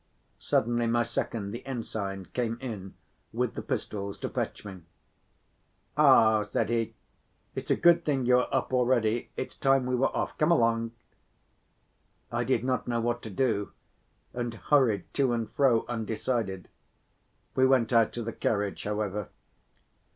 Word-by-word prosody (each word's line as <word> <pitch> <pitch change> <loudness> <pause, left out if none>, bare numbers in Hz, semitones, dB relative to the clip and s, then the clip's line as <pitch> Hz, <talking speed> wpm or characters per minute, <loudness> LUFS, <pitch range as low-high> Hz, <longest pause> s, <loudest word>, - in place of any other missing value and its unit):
Suddenly 120 0 +1
my 120 +1 +2
second, 105 -3 -3
the 120 - -6
ensign, 105 -7 -4
came 115 -2 -1
in 105 -7 -6 0.4
with - - -1
the - - -5
pistols 100 -1 -4
to - - -4
fetch - - -4
me. 95 -3 -8 1.1
"Ah," 130 -7 +6
said 105 - -1
he, 115 -1 -1 0.6
"it's - - -6
a - - +4
good 170 0 +5
thing 135 -5 0
you 125 0 +5
are 125 - 0
up 130 -1 -1
already, 120 -2 +2
it's - - -4
time 135 -1 +2
we 125 - -1
were 125 +2 +3
off, - - -2
come 155 - +3
along!" 115 -7 +3 1.4
I 120 +1 0
did 130 +1 +1
not 130 0 -1
know 120 -1 0
what 120 +1 -1
to 110 - -7
do 105 -1 0 0.6
and 120 -1 -3
hurried 115 -7 +2
to 135 -3 +2
and 115 -2 -1
fro 130 -5 +3
undecided; 110 -4 -2 0.9
we 130 0 +4
went 125 -3 +3
out 115 -2 +4
to 120 - -4
the 115 - -4
carriage, 100 -2 -1
however. 105 -1 -2
115 Hz, 150 wpm, -28 LUFS, 110-125 Hz, 1.4 s, Ah